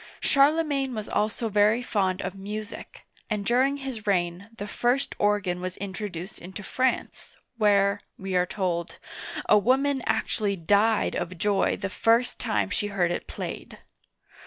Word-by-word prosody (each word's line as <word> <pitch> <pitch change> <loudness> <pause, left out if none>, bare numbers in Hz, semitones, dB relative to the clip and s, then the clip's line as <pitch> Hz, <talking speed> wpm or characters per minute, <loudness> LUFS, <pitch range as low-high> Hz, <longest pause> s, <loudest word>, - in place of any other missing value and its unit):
Charle 295 +3 +4
magne 275 -4 -1
was 215 -1 -4
also 215 +2 0
very 210 +3 +3
fond 195 -5 0
of 185 - -3
music, 210 +3 -7 0.2
and 210 -2 -2
during 260 +5 +3
his 260 -6 -6
reign 180 +1 0
the 205 - -5
first 245 +5 0
organ 205 -4 +1
was 185 0 -4
introduced 195 -2 -6
into 190 +4 -8
France, 260 +5 -2 0.2
where, 200 -2 +3 0.2
we 190 -1 -4
are 180 0 +3
told, 175 -3 -2 0.5
a - - +6
woman 270 +5 +2
actually 205 -2 0
died 205 +5 +2
of 180 0 -3
joy 200 +2 +1
the - - -3
first 230 +5 +2
time 105 -3 0
she 205 - 0
heard 185 -4 +1
it - - -3
played. - - -6
205 Hz, 150 wpm, -26 LUFS, 185-230 Hz, 0.5 s, a